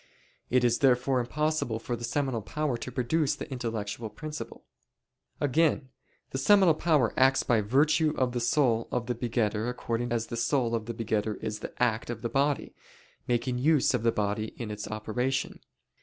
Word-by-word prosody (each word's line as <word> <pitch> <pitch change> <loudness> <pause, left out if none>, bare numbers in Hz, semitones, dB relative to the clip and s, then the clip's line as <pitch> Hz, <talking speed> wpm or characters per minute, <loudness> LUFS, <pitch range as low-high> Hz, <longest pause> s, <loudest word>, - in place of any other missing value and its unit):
It 125 0 +3
is 120 -1 +2
therefore 130 0 +3
impossible 150 -2 -1
for 120 +2 -4
the 120 - -9
seminal 130 -1 -1
power 150 +5 -2
to 120 +2 -6
produce 140 +4 0
the - - -7
intellectual 115 -3 -4
principle. 155 +5 -8 0.7
Again, 145 -1 +2 0.4
the 135 - -2
seminal 190 +3 +5
power 150 -7 +2
acts 135 +1 +4
by 115 -3 +2
virtue 150 +8 +3
of 130 -1 +1
the 120 - -2
soul 120 -2 +2
of 120 - -1
the 125 - -1
begetter 115 -2 -1
according 120 -1 -3
as 115 -1 0
the 115 - -6
soul 120 0 +1
of 115 -1 -2
the 115 - -4
begetter 110 -1 -1
is 105 -1 -3
the - - -6
act 115 -3 +1
of 120 -1 -5
the 115 - -1
body, 140 +2 0 0.5
making 125 +1 0
use 145 0 +3
of 125 - 0
the 115 0 +3
body 105 +1 -2
in 115 -3 -5
its 105 0 -5
operation. 125 +5 -2
120 Hz, 175 wpm, -28 LUFS, 115-135 Hz, 0.7 s, seminal